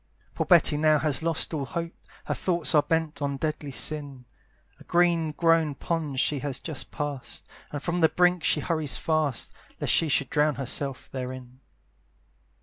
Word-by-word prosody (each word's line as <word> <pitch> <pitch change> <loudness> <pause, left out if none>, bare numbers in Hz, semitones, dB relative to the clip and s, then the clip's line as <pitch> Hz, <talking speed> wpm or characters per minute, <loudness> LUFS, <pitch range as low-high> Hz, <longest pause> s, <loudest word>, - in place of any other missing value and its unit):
Poor - - -2
Betty 150 - +5
now 155 0 +4
has 150 -1 +1
lost 165 0 -1
all 150 -3 -1
hope, 170 +4 -4 0.3
Her - - -1
thoughts 175 -3 +1
are 150 - +6
bent 160 -2 -1
on 140 -1 -1
deadly 155 0 -3
sin; 140 -2 -2 0.5
A - - -14
green 170 -2 +2
grown 165 -1 +2
pond 155 -3 -2
she 145 +1 +1
just 135 -1 -5
has 155 -5 -3
pass'd, 145 -3 -6 0.2
And 145 -1 -5
from 175 0 -1
the 160 - +6
brink 180 -1 +2
she 150 - +2
hurries 155 -4 -1
fast, 155 -6 -1 0.3
Lest - - +1
she 165 - +3
should 140 - +1
drown 150 0 +2
herself 135 0 -2
therein. 130 -1 -7
150 Hz, 165 wpm, -26 LUFS, 140-165 Hz, 0.5 s, are